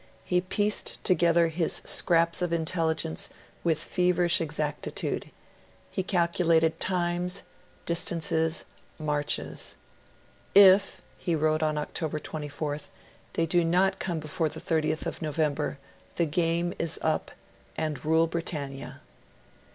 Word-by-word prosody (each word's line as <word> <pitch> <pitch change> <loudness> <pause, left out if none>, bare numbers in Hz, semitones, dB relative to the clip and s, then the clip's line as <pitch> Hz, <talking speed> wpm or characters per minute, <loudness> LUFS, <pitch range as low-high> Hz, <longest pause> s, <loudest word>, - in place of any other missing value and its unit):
He 180 +7 +1
pieced 205 +3 -1
together 170 -2 +4
his 165 +1 0
scraps 170 0 +2
of 175 -1 0
intelligence 160 - -1 0.3
with 165 -3 +2
feverish 180 -1 +2
exactitude; 155 -1 -3 0.6
he 190 - -1
calculated 170 -3 +2
times, 180 0 0 0.4
distances, 160 -1 +1 0.3
marches. 150 -2 -1 0.8
'If,' 195 0 +7 0.2
he 170 -3 0
wrote 155 0 +1
on 155 -1 +1
October 155 +1 -2
24th, 150 0 -5 0.4
they 165 - +1
do 175 +1 +2
not 185 +3 +2
come 175 -3 -2
before 155 +1 -1
30th 155 +1 -2
November, 150 -2 -1 0.4
the 170 - +2
game 170 +2 0
is 165 -2 0
up, - - 0 0.5
and 155 -4 -2
Rule 160 +1 +4
Britannia.' 140 -5 -4
165 Hz, 105 wpm, -28 LUFS, 155-175 Hz, 0.8 s, If